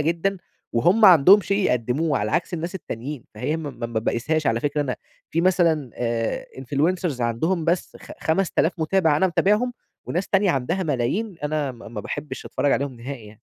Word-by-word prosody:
جدًا، 170 Hz, +6 st, 0 dB, 0.4 s
وهُم 175 Hz, -, +4 dB
عندهم 185 Hz, +2 st, +8 dB
شيء 200 Hz, 0 st, -1 dB
يقدموه، 130 Hz, +5 st, 0 dB
على 105 Hz, +1 st, -2 dB
عكس 175 Hz, +2 st, -1 dB
الناس 170 Hz, +2 st, -4 dB
التانيين، 140 Hz, -5 st, -6 dB
فهي 130 Hz, +9 st, -2 dB
ما 155 Hz, -3 st, -5 dB
ما 120 Hz, -1 st, -5 dB
ما 115 Hz, -1 st, -2 dB
باقيسهاش 150 Hz, +7 st, -1 dB
على 115 Hz, +1 st, +1 dB
فكرة 145 Hz, +1 st, -1 dB
أنا 130 Hz, -4 st, -2 dB, 0.3 s
في 165 Hz, -, +1 dB
مثلًا 170 Hz, -7 st, +2 dB
آآ 115 Hz, -1 st, -2 dB
influencers 145 Hz, +2 st, -1 dB
عندهم 160 Hz, +10 st, 0 dB
بس 170 Hz, +2 st, -1 dB
خ -, -, -11 dB
خمسة 180 Hz, +3 st, 0 dB
ألاف 165 Hz, -, +3 dB
مُتابع 160 Hz, -1 st, +2 dB
أنا 190 Hz, -, +3 dB
متابعهم، 210 Hz, +7 st, +2 dB, 0.3 s
وناس 180 Hz, +3 st, -2 dB
تانية 195 Hz, -1 st, +3 dB
عندها 165 Hz, +7 st, -1 dB
ملايين 160 Hz, -, -1 dB
أنا 150 Hz, -2 st, -1 dB
ما 120 Hz, -, -12 dB
ما 110 Hz, -2 st, -6 dB
باحبش 145 Hz, +8 st, -6 dB
أتفرج 145 Hz, -, 0 dB
عليهم 140 Hz, -2 st, -1 dB
نهائي 125 Hz, -2 st, -7 dB
يعني. 105 Hz, 0 st, -15 dB
155 Hz, 180 wpm, -23 LUFS, 125-180 Hz, 0.4 s, عندهم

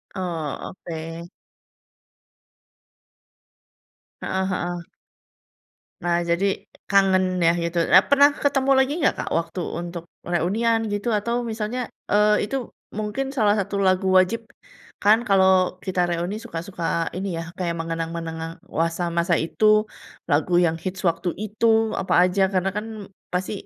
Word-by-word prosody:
Oh, 170 Hz, -6 st, -4 dB
oke. 165 Hz, +1 st, -6 dB, 2.9 s
Heeh 190 Hz, 0 st, -1 dB
heeh. 175 Hz, -1 st, -3 dB, 1.1 s
Nah, 175 Hz, -1 st, +2 dB
jadi 170 Hz, +3 st, +2 dB, 0.4 s
kangen, 195 Hz, -1 st, +4 dB, 0.2 s
ya, 165 Hz, -, +6 dB
gitu. 170 Hz, +1 st, -3 dB
Nah, -, -, +10 dB
pernah 285 Hz, 0 st, +7 dB
ketemu 275 Hz, -1 st, +2 dB
lagi 265 Hz, +2 st, +2 dB
nggak, -, -, +4 dB
Kak, -, -, -3 dB
waktu 165 Hz, +2 st, -3 dB, 0.2 s
untuk 170 Hz, -1 st, -6 dB, 0.2 s
reunian, 205 Hz, +7 st, +1 dB
gitu, 205 Hz, +2 st, -3 dB
atau 235 Hz, +3 st, -2 dB, 0.2 s
misalnya, 220 Hz, +3 st, -3 dB, 0.3 s
eee, 210 Hz, +1 st, +4 dB
itu 270 Hz, -, -3 dB, 0.4 s
mungkin 215 Hz, +5 st, -2 dB
salah 210 Hz, -5 st, +3 dB
satu 200 Hz, +1 st, -3 dB
lagu 185 Hz, +1 st, +2 dB
wajib, 185 Hz, +5 st, +3 dB, 0.6 s
kan, 210 Hz, +2 st, +6 dB
kalau 190 Hz, -2 st, +4 dB
kita 185 Hz, -2 st, 0 dB
reuni 175 Hz, +5 st, -2 dB
suka 220 Hz, -8 st, -6 dB
suka 170 Hz, -3 st, -2 dB
ini, 190 Hz, -1 st, -3 dB
ya, 165 Hz, -, -3 dB, 0.2 s
kayak 170 Hz, -2 st, -1 dB
mengenang-mengenang 165 Hz, +1 st, -4 dB, 0.2 s
wasa 165 Hz, +1 st, 0 dB
masa 170 Hz, 0 st, +2 dB
itu, 165 Hz, +7 st, -1 dB, 0.7 s
lagu 155 Hz, +5 st, +2 dB
yang 165 Hz, 0 st, -1 dB
hits 190 Hz, 0 st, -4 dB
waktu 170 Hz, 0 st, +1 dB
itu, 215 Hz, +2 st, 0 dB, 0.3 s
apa 190 Hz, -, -1 dB
aja 180 Hz, +2 st, +1 dB
karena, 185 Hz, 0 st, +1 dB
kan, 210 Hz, +3 st, -4 dB, 0.5 s
pasti 180 Hz, +1 st, -1 dB
185 Hz, 130 wpm, -23 LUFS, 170-205 Hz, 2.9 s, Nah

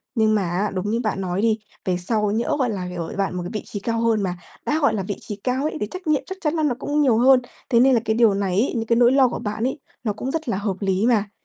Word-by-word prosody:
nhưng 220 Hz, -2 st, +3 dB
mà 210 Hz, -, +2 dB
á, 190 Hz, +4 st, -1 dB
đúng 190 Hz, +2 st, -2 dB
như 230 Hz, -, +1 dB
bạn 215 Hz, -4 st, -2 dB
nói 185 Hz, +1 st, -1 dB
đi, 220 Hz, -1 st, +2 dB, 0.3 s
về 185 Hz, -1 st, +1 dB
sau 210 Hz, +3 st, 0 dB
nhỡ, 225 Hz, +3 st, 0 dB
gọi 255 Hz, -2 st, +2 dB
là, 195 Hz, -4 st, -3 dB
ng 180 Hz, 0 st, -6 dB
ở 170 Hz, -2 st, -4 dB
bạn 195 Hz, -2 st, -1 dB
một 180 Hz, -, -3 dB
cái 175 Hz, -, -5 dB
vị 215 Hz, -, -2 dB
trí 205 Hz, -, -6 dB
cao 230 Hz, +2 st, -1 dB
hơn, 225 Hz, -2 st, +2 dB
mà 180 Hz, -2 st, -2 dB, 0.3 s
đã 305 Hz, -, +1 dB
gọi 285 Hz, -, +3 dB
là 200 Hz, -, -1 dB
vị 200 Hz, +1 st, -3 dB
trí 210 Hz, -, -6 dB
cao 255 Hz, +2 st, 0 dB
ấy, 310 Hz, +1 st, -2 dB
thì 210 Hz, -, -2 dB
trách 365 Hz, -, -8 dB
nhiệm 305 Hz, -2 st, +3 dB
chắc 380 Hz, -, -7 dB
chắn 300 Hz, -1 st, 0 dB
là 315 Hz, -, 0 dB
nó 280 Hz, -5 st, +1 dB
cũng 295 Hz, +1 st, 0 dB
nhiều 255 Hz, -6 st, +4 dB
hơn, 255 Hz, +2 st, +6 dB, 0.3 s
thế 235 Hz, -, +4 dB
nên 260 Hz, +2 st, +5 dB
là 240 Hz, -, +4 dB
cái 220 Hz, -, +1 dB
điều 230 Hz, -3 st, +5 dB
này 195 Hz, -1 st, -1 dB
ấy, 260 Hz, -, 0 dB
những 225 Hz, -1 st, -1 dB
cái 230 Hz, -, +3 dB
nỗi 240 Hz, +1 st, +5 dB
lo 265 Hz, -1 st, +5 dB
của -, -, -4 dB
bạn 210 Hz, +1 st, -3 dB
ấy, 260 Hz, -, -1 dB, 0.2 s
nó 215 Hz, -3 st, 0 dB
cũng 250 Hz, +6 st, -4 dB
rất 320 Hz, -3 st, -3 dB
là 190 Hz, -, 0 dB
hợp 200 Hz, -1 st, -2 dB
lý 195 Hz, +1 st, +1 dB
mà. 215 Hz, -4 st, +2 dB
220 Hz, 320 wpm, -22 LUFS, 200-250 Hz, 0.3 s, hơn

